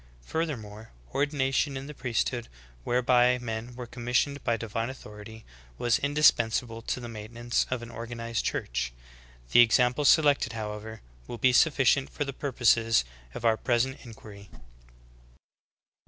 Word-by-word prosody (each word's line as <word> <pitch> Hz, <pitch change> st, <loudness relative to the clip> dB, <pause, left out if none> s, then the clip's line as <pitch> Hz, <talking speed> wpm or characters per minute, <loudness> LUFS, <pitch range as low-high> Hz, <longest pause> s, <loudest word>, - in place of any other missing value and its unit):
^ -, -, -24 dB
Furthermore, 115 Hz, -10 st, -4 dB, 0.2 s
ordination 140 Hz, -1 st, 0 dB
in 135 Hz, -, -6 dB
the 150 Hz, -, -8 dB
priesthood, 120 Hz, -2 st, -2 dB, 0.4 s
whereby 125 Hz, 0 st, +3 dB
men 120 Hz, 0 st, -5 dB
were 125 Hz, 0 st, -6 dB
commissioned 125 Hz, +4 st, -1 dB
by 115 Hz, -, +1 dB
divine 115 Hz, +1 st, -3 dB
authority, 110 Hz, -3 st, -11 dB, 0.3 s
was 120 Hz, -1 st, +2 dB
indispensable 120 Hz, -5 st, +2 dB
to 120 Hz, -, -3 dB
the 120 Hz, -, -7 dB
maintenance 115 Hz, +2 st, -2 dB
of 125 Hz, -2 st, -3 dB
an 120 Hz, -, -9 dB
organized 115 Hz, 0 st, -4 dB
Church. -, -, -2 dB, 0.6 s
The -, -, +6 dB
examples 125 Hz, +4 st, +5 dB
selected, 145 Hz, -7 st, +4 dB
however, 110 Hz, 0 st, -6 dB, 0.3 s
will 120 Hz, -, -6 dB
be 130 Hz, +1 st, +3 dB
sufficient 135 Hz, -1 st, +3 dB
for 145 Hz, -, -3 dB
the 140 Hz, -, -5 dB
purposes 115 Hz, -, +2 dB, 0.3 s
of -, -, -5 dB
our 110 Hz, -1 st, +4 dB
present 125 Hz, +4 st, 0 dB
inquiry. 105 Hz, -4 st, -12 dB
120 Hz, 135 wpm, -28 LUFS, 115-130 Hz, 0.6 s, The